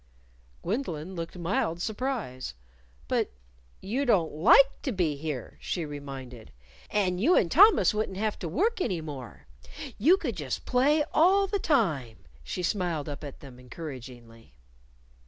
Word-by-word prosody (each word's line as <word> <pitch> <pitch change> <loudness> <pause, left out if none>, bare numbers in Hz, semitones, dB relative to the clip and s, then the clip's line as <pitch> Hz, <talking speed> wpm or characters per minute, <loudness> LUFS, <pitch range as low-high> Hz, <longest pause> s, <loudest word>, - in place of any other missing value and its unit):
Gwendolyn 185 - -3
looked 165 +1 -6
mild 170 -1 -1
surprise. 215 - -3 0.5
"But - - 0 0.5
you 245 +8 -1
don't 200 - +2
like 270 - +5
to 270 - -2
be 175 -8 0
here," 145 -4 -6
she 170 -3 -3
reminded. 135 -5 -8 0.4
"And 185 -3 0
you 330 - +4
and 170 - +2
Thomas 405 - +6
wouldn't 210 -3 -2
have 215 +1 -1
to 170 - -4
work 405 - 0
any 190 - 0
more; 140 -7 -8 0.5
you 325 - +6
could 250 - -3
just 140 -5 -4
play 290 +5 +3
all 385 +5 +5
the 400 +1 -2
time." 155 - 0 0.2
She 180 - -4
smiled 175 -5 -1
up 145 0 -6
at 140 -2 -9
them 130 -3 -12
encouragingly. 125 - -10
175 Hz, 140 wpm, -28 LUFS, -, 0.5 s, Thomas